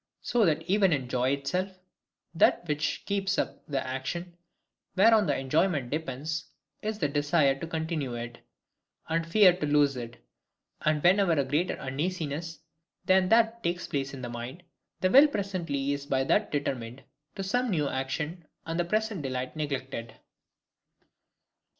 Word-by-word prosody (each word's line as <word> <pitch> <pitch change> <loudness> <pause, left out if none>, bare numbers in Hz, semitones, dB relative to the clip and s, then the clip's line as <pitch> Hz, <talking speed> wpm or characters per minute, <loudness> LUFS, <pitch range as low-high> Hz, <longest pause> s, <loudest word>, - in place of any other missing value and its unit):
So 240 -3 +2
that 160 0 +1
even 195 +2 +3
in 135 -4 -2
joy 125 +1 +1
itself, 180 +7 -2 0.6
that 170 +1 +3
which 150 0 -1
keeps 195 -1 0
up - - -2
the 140 -3 -2
action 150 +7 -4 0.6
whereon 215 0 +5
the 145 - +1
enjoyment 140 0 0
depends, 155 +1 -3 0.4
is 215 0 -3
the 150 - +1
desire 145 0 +2
to 165 - -5
continue 160 -6 -3
it, 120 0 -6 0.7
and 165 0 -1
fear 195 -4 +7
to 180 - -3
lose 145 -1 +3
it: 120 -2 -7 0.6
and 150 -1 +1
whenever 185 0 +4
a 140 -4 +1
greater 150 +7 0
uneasiness 160 +3 -3 0.5
than 185 -1 +4
that 230 0 +3
takes 175 -1 -2
place 140 -1 -2
in 135 -2 -8
the 120 - -4
mind, 120 +8 -7 0.4
the 185 0 +2
will 280 +3 +9
presently 170 - -2
is 140 0 -5
by 135 -2 +1
that - - +1
determined 130 -4 -3 0.3
to 195 - -4
some 245 +6 0
new 155 -8 +1
action, 150 +6 -3 0.2
and 165 +1 -3
the 175 - +1
present 215 0 -1
delight 130 -1 -4
neglected. 135 -6 -4
155 Hz, 150 wpm, -28 LUFS, 135-185 Hz, 0.7 s, will